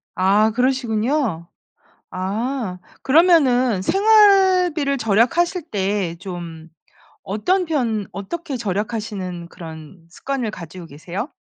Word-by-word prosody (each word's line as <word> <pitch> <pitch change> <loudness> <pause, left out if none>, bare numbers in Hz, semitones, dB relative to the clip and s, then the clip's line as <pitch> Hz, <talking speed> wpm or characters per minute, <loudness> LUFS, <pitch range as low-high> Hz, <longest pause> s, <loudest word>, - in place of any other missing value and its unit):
아 200 +4 +3
그러시군요. 240 - 0 0.6
아. 200 +2 -3 0.2
그러면은 260 - +4
생활비를 380 - +4
절약하실 250 - +1
때 195 -3 -1
좀 170 -3 -8 0.5
어떤 360 - 0
편 230 - -1
어떻게 280 - -5
절약하시는 205 -4 -4
그런 165 -1 -11
습관을 260 +1 -3
가지고 175 -2 -10
계세요? 175 - -6
220 Hz, 225 characters per minute, -20 LUFS, 185-280 Hz, 0.6 s, 그러면은